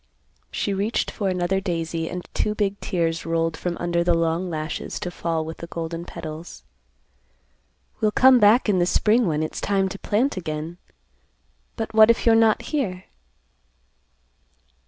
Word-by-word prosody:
She 200 - -2
reached 205 +4 -1
for 200 -2 -2
another 180 +1 0
daisy 165 -3 -2
and 180 0 -6
two 210 - 0
big 200 -1 -1
tears 165 -3 -1
rolled 165 0 0
from 175 0 -3
under 170 0 0
the 175 -1 +3
long 165 +2 0
lashes 155 -1 -4
to 180 -4 -4
fall 165 -2 -2
with 160 0 -7
the 170 - -8
golden 165 0 -5
petals. 165 -1 -8 1.4
"We'll 215 - +3
come 255 +3 +6
back 215 +4 +5
in 195 -3 +2
the 175 - +2
spring 220 +4 +3
when 155 -1 0
it's 155 - -5
time 195 -1 +1
to 195 - -8
plant 225 +3 0
again, 160 0 -5 1.0
but 225 -1 -4
what 220 0 +7
if 235 - +2
you're 230 - +6
not 225 -1 +4
here?" 195 -12 -3
180 Hz, 155 wpm, -23 LUFS, 165-210 Hz, 1.4 s, what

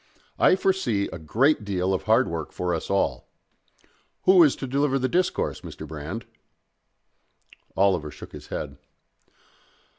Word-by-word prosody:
I - - +6
foresee 185 - 0
a 95 - -6
great 115 - +2
deal 95 -2 -1
of 95 - -1
hard 120 +4 +4
work 80 -2 -4
for 90 -1 -2
us 80 - -4
all.... 100 - 0 0.9
Who 185 -1 +7
is 150 -5 +5
to - - -6
deliver 135 +1 +1
the 130 -1 0
discourse, 180 +5 0
Mr. - - -9
Brand?" 80 +9 -6 1.5
Oliver 95 -6 +2
shook - - -11
his - - -11
head. 70 -1 -6
100 Hz, 140 wpm, -25 LUFS, 90-140 Hz, 1.5 s, Who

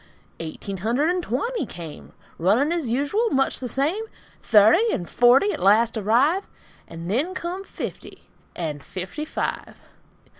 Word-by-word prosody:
Eighteen 165 +4 -6
hundred 240 - +1
and 360 0 -1
twenty 340 - -2
came; 165 -3 -10 0.3
Running 220 - +3
as 335 -8 -1
usual; 290 - +1
much 270 -7 +1
the 255 - -4
same. 295 - 0 0.4
Thirty 230 - +5
and 175 - -3
forty 255 +12 +4
at - - -5
last 220 +5 +4
arrive, 250 - +2 0.4
And 165 +1 -8
then 285 - 0
come 365 +2 -4
fifty, - - -8 0.3
and 150 -4 -4
FIFTY 190 +12 -6
FIVE. 310 - -4
250 Hz, 140 wpm, -23 LUFS, -, 0.4 s, Thirty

